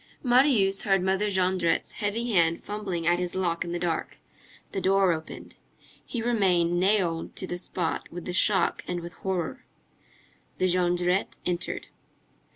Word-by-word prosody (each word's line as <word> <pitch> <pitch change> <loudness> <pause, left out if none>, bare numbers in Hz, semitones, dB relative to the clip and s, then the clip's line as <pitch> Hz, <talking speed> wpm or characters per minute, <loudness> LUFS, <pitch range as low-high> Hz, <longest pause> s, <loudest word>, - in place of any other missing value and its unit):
Marius 245 -7 +4
heard 195 -3 +2
Mother 190 +2 +1
Jondrette's 185 -3 +1
heavy 230 +3 -2
hand 170 -4 +2
fumbling 195 -5 -4
at 175 +1 +3
his 180 0 -3
lock 175 -3 0
in 170 - -6
the 175 - -1
dark. 170 -2 -2 0.5
The 195 - -2
door 195 -1 +3
opened. 160 -1 -8 0.5
He 235 -3 -4
remained 180 -7 +2
nailed 180 -4 +1
to - - -3
the 175 -1 -4
spot 180 0 -2
with 175 0 -7
the 180 - -4
shock 190 0 +3
and 175 -1 -3
with 170 0 -8
horror. 185 -4 -3 0.9
The 185 - +1
Jondrette 180 +1 +1
entered. 175 -1 -2
185 Hz, 150 wpm, -27 LUFS, 175-195 Hz, 0.9 s, Marius